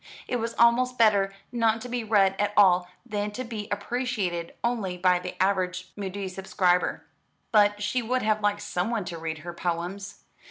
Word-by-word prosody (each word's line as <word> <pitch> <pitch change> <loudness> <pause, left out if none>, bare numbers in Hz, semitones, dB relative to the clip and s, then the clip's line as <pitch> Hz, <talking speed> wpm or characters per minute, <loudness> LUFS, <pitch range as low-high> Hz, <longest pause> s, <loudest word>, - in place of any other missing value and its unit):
It 250 - -1
was 230 0 -3
almost 250 +2 +4
better 205 -3 +4 0.2
not 230 -2 +2
to 250 - -6
be 245 -1 -2
read 200 -3 +3
at 205 0 +1
all 180 -3 +5 0.2
than 210 -3 -2
to 255 - -4
be 220 -4 -6
appreciated 205 -5 -2
only 220 -7 -1
by 180 0 +3
the - - -7
average 185 -1 0
Mudie 195 -1 -4
subscriber. 185 -1 0 0.5
But 205 -1 +4
she 250 +4 0
would 250 +2 -1
have 215 0 +1
liked 205 0 +1
someone 205 +3 -2
to 170 -2 -6
read 160 -1 -4
her 175 - -5
poems. 175 +4 -4
205 Hz, 170 wpm, -26 LUFS, 185-230 Hz, 0.5 s, all